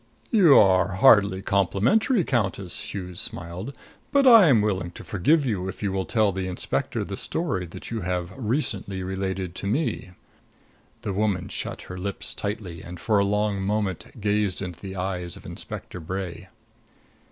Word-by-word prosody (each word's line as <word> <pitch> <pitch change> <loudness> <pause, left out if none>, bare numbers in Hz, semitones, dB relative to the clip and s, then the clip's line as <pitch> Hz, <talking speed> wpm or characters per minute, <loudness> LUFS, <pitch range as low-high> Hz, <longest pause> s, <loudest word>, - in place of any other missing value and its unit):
"You 175 -10 +7
are 95 -1 +5
hardly 100 -2 +5
complimentary, 110 - +2
Countess," 100 - -2
Hughes 90 -3 -6
smiled. 90 +8 -5 0.4
"But 280 -1 +4
I 230 -8 +9
am 115 -8 +5
willing 95 -4 -1
to - - -10
forgive 145 - +2
you 100 -7 -1
if 95 - -8
you 100 - 0
will 95 -1 -2
tell 110 -4 +3
the 95 0 -3
inspector 90 - -2
the - - -5
story 100 - -2
that 85 - -9
you 115 - -2
have 90 0 -2
recently 115 -6 -2
related 95 -1 -3
to 100 - -5
me." 105 - -1 0.9
The 105 -4 -2
woman 100 -2 0
shut - - -4
her 90 0 -8
lips 100 +1 -2
tightly 100 -5 -5
and 90 0 -9
for 105 +1 +2
a - - +4
long 105 0 0
moment 100 0 -2
gazed 105 -2 0
into 90 -4 -5
the 95 -1 -7
eyes 90 -2 -3
of - - -15
Inspector 90 - -7
Bray. 90 +1 -5
95 Hz, 165 wpm, -25 LUFS, 90-110 Hz, 0.9 s, I